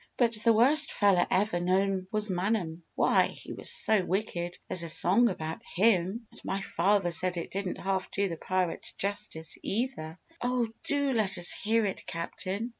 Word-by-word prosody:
But 235 -2 +2
the 230 - +5
worst 275 +7 +6
feller 195 -4 +2
ever 195 -1 +1
known 185 +1 0
was 215 0 +2
Manum. 180 -3 -2
Why, - - +3
he - - -10
was - - -1
so 215 -4 +3
wicked 175 -2 -3
there's 180 - +3
a 170 - -1
song 195 +9 +4
about 160 -3 -5
him! 200 +2 +1
And - - -15
my 195 - -2
father 195 0 +1
said 175 +2 +1
it 170 - -5
didn't 195 -1 -4
half 190 0 -2
do 200 0 -1
the 170 - -5
pirate 185 -1 -3
justice, 200 -5 -4
either!" 200 -8 -3 0.2
"Oh, 245 -2 0 0.2
do 285 -2 +1
let 215 -5 +1
us 175 0 +5
hear 225 +1 +1
it, 195 - -4
Captain!" 190 +6 -4
195 Hz, 175 wpm, -28 LUFS, 175-220 Hz, 0.2 s, worst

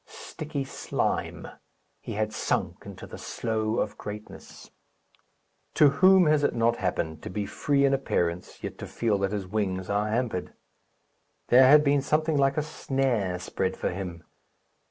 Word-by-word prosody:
Sticky 150 -2 -6
slime! 135 - -3 0.5
He - - -7
had 110 +1 -2
sunk - - -2
into - - -9
the - - -10
slough 110 -1 -2
of 105 - -20
greatness. 105 +1 -9 1.0
To 150 - +7
whom 185 +6 +5
has 150 -1 +3
it - - +1
not 115 0 +2
happened 80 -4 -2
to - - -7
be 100 +2 -3
free 140 +4 +1
in 140 - +3
appearance, 90 -10 -2
yet - - -6
to - - -6
feel 110 -4 0
that 100 0 0
his 105 -2 -3
wings 95 -2 -2
are 105 +1 +1
hampered? 110 -4 -2 1.0
There 130 +1 +7
had 150 +1 +8
been 140 -1 +3
something 155 +3 +1
like 140 0 +2
a 150 - +1
snare 130 - -1
spread 95 +1 -3
for - - -1
him. 90 -2 -6
115 Hz, 155 wpm, -27 LUFS, 100-140 Hz, 1.0 s, had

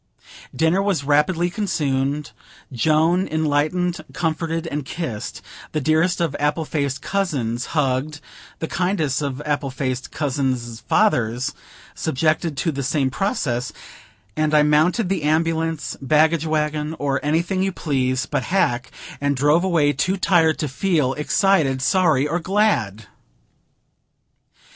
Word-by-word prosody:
Dinner 160 +4 +2
was 195 -8 0
rapidly 155 +5 +2
consumed; 145 -7 -1 0.4
Joan 160 - +2
enlightened, 155 +3 0
comforted, 165 0 -2
and 150 -2 -3
kissed; 130 -7 -5 0.3
the 155 - +1
dearest 160 +5 +2
of 165 -5 -1
apple 150 +2 0
faced 140 -3 -2
cousins 135 - -1
hugged; 145 +1 0 0.4
the 160 - -4
kindest 160 -7 0
of 140 0 -3
apple 145 -2 -1
faced 130 -1 -3
cousins' 130 -5 -2
fathers 125 - +2 0.4
subjected 155 +1 0
to 165 - 0
the 140 -1 -4
same 135 0 0
process; 125 - -1 0.6
and 155 0 +1
I 150 - +6
mounted 155 +8 +3
the 190 -2 -1
ambulance, 160 +1 0
baggage 155 +3 +3
wagon, 150 0 -1
or 140 -1 -1
anything 170 +5 0
you 195 0 +1
please 130 -6 -1
but 125 - -2
hack, 125 -10 0 0.3
and 145 0 +1
drove 145 +6 +3
away, 160 -6 +2
too 185 +8 0
tired 165 -4 +3
to 150 - -2
feel 145 -2 0
excited, 150 -3 +2
sorry, 145 +1 +2
or 165 +4 -1
glad. 170 - 0
150 Hz, 125 wpm, -21 LUFS, 135-170 Hz, 0.6 s, I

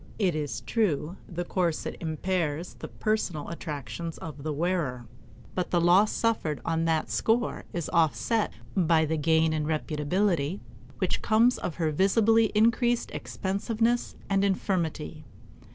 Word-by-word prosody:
It 190 -5 +2
is 145 -8 -3
true, 185 -5 0
the 175 0 -3
corset 175 -3 -1
impairs 165 0 -2
the - - -8
personal 210 -8 -2
attractions 165 +1 -5
of 150 -3 -8
the 155 +2 -2
wearer, 150 -6 -1 0.5
but 180 -1 -2
the 175 - +2
loss 180 +5 +5
suffered 215 -10 0
on 165 0 0
that 160 -1 0
score 235 +2 0
is 170 -3 -3
offset 170 +7 +2 0.2
by 165 -4 +3
the 160 +1 0
gain 160 +1 +3
in 155 -1 -1
reputability 155 +2 0 0.4
which - - -1
comes 230 +3 +3
of 170 - -4
her 160 -3 0
visibly 220 +7 +4
increased 235 +2 +3
expensiveness 225 +5 -1
and 195 0 +2
infirmity. 170 -5 -1
170 Hz, 135 wpm, -28 LUFS, 155-200 Hz, 0.5 s, loss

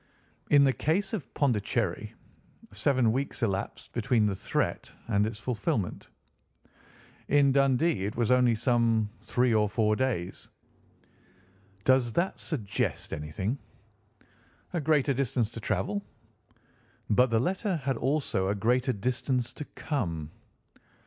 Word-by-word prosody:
In 145 -1 +6
the 135 -1 +4
case 175 - 0
of 205 -9 -4
Pondicherry, 110 - 0 0.6
seven 130 -6 +2
weeks 135 +1 -2
elapsed 100 -3 -3
between 120 -2 +2
the 105 - +1
threat 95 - -2 0.2
and 105 -2 +2
its 110 - -5
fulfilment, 110 -4 -2 1.2
in 140 -1 +4
Dundee 135 - +2
it 105 - -3
was 120 0 +1
only 125 -2 +4
some 115 -2 +2
three 125 -1 +1
or 105 -1 +3
four 110 0 +2
days. 105 -8 -2 1.4
Does 130 -3 +3
that 175 - 0
suggest 115 - -2
anything?" 95 - -3 1.1
"A 170 - 0
greater 145 -2 +2
distance 125 -4 0
to - - -7
travel." 200 - -1 1.1
"But 125 +4 +4
the 115 0 +2
letter 190 - 0
had 135 -4 -1
also 135 -9 0
a 100 - 0
greater 125 +5 +1
distance 125 +3 -1
to 150 - -7
come." 85 - -3
120 Hz, 125 wpm, -28 LUFS, 105-140 Hz, 1.4 s, In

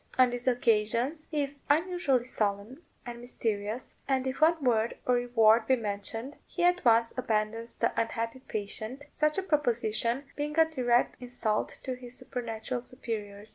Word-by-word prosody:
On 255 -1 +6
these 245 +1 -5
occasions 240 +5 +1
he 300 -3 0
is 280 0 -7
unusually 300 -5 +2
solemn 215 +4 -2 0.2
and 240 -1 -7
mysterious, 225 -1 -3
and 265 -1 +1
if 260 +3 -3
one 320 -1 +4
word 230 -2 +2
of 250 - +3
reward 235 -2 +4
be 260 - +5
mentioned 225 +4 -4
he 350 - -3
at 355 0 +3
once 230 -1 +4
abandons 225 -1 -1
the - - +1
unhappy 230 +2 -3
patient, 220 +3 -5
such 305 +2 +1
a 385 - 0
proposition 240 - +1
being 295 +1 -3
a 325 - +7
direct 250 -6 +1
insult 245 -4 -1
to 260 - -2
his 250 0 -7
supernatural 240 -1 -4
superiors. 215 -4 -6
245 Hz, 155 wpm, -29 LUFS, 225-270 Hz, 0.2 s, a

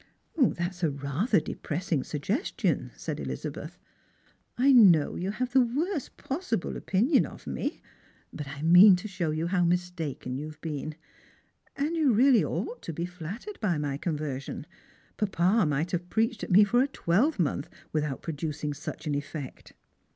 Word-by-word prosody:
" - - -42
That's 185 - 0
rather 145 - +1
a - - +3
depressing 160 -3 -2
suggestion," 195 - -1
said - - -4
Ehzabeth. - - -6 0.4
" - - -37 0.3
I 265 +3 +5
know 190 - +6
you 185 +2 -2
have 245 +4 -3
the 265 - +6
worst 290 +6 -2
possible 270 - -3
opinion 240 - +2
of - - -13
me; - - -3 0.5
but 150 - -6
I 140 +2 -7
mean 180 +4 +8
to 180 +4 -5
show 185 -5 -2
you 155 +2 -1
how 180 0 +1
mistaken 170 -7 -2
you 150 - -5
have 155 0 -11
been. 155 -1 -5 0.8
And 295 +4 -1
you 300 -7 +3
really 250 +2 +5
ought - - -3
to 165 - -6
feel 170 +3 -3
flattered 180 - -7
by 180 -7 0
my 145 -2 -2
conversion. 145 -4 -4 0.5
Papa 195 -1 +2
might 150 +4 -1
have 175 0 -3
preached 225 0 0
at - - -4
me 200 +3 +7
for 245 +5 +3
a 270 - +2
twelvemonth 180 - 0 0.2
without 150 -3 -2
producing 150 -2 -3
such 155 +3 -7
an 150 - -1
effect." 145 -1 -6
175 Hz, 160 wpm, -28 LUFS, 150-230 Hz, 0.8 s, mean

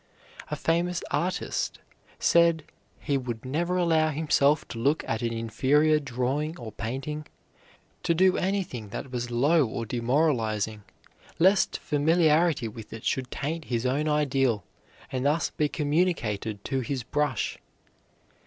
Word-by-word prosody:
A 150 - -2
famous 170 +3 0
artist 180 +2 -1 0.4
said 170 -2 +4 0.4
he 140 -1 0
would 120 -2 -5
never 170 +7 -1
allow 160 -3 +3
himself 150 -1 +2
to 115 - -6
look 145 +7 +1
at 115 +1 -1
an 115 -1 -1
inferior 140 +7 +2
drawing 140 +4 -2
or 115 -3 -7
painting, 135 +8 -5 0.7
to 170 - +1
do 185 +2 +4
anything 185 - -2
that 130 +5 -6
was 120 -1 -3
low 145 +7 +3
or 115 -1 -3
demoralizing, 115 -4 0 0.6
lest 190 +3 +4
familiarity 155 -2 +2
with 110 0 -10
it 115 - -8
should 130 -1 -1
taint 155 +3 -4
his 120 0 -2
own 140 +4 +1
ideal 135 -8 +1 0.5
and 130 -1 -2
thus 150 +4 +1
be 150 -1 0
communicated 145 - -1
to 135 -1 -1
his 130 0 -3
brush. 145 -1 -1
145 Hz, 135 wpm, -27 LUFS, 120-160 Hz, 0.7 s, said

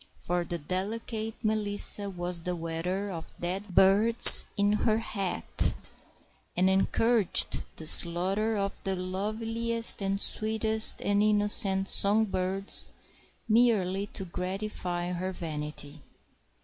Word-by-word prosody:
For 175 0 -5
the 170 +1 -7
delicate 215 +7 -7
Melissa 205 -1 -2
was 175 -2 -2
the 180 +1 -6
wearer 175 +4 -6
of 165 -3 -11
dead 185 +2 -7
birds 210 +6 +10
in 205 0 -1
her 215 +1 -2
hat, 195 - -6 0.8
and 185 +1 0
encouraged 205 +2 -1
the 160 - -10
"slarter" 190 +7 -2
of 200 0 -5
the 195 0 -4
loveliest 225 +5 -4
and 195 0 -4
sweetest 220 +1 0
of - - -10
innocent 205 -1 +1
song 210 +2 +1
birds 190 0 +4 0.6
merely 210 -4 -1
to 195 - -8
gratify 180 -1 -7
her 180 +1 -7
vanity. 150 -3 -10
195 Hz, 110 wpm, -25 LUFS, 180-215 Hz, 0.8 s, birds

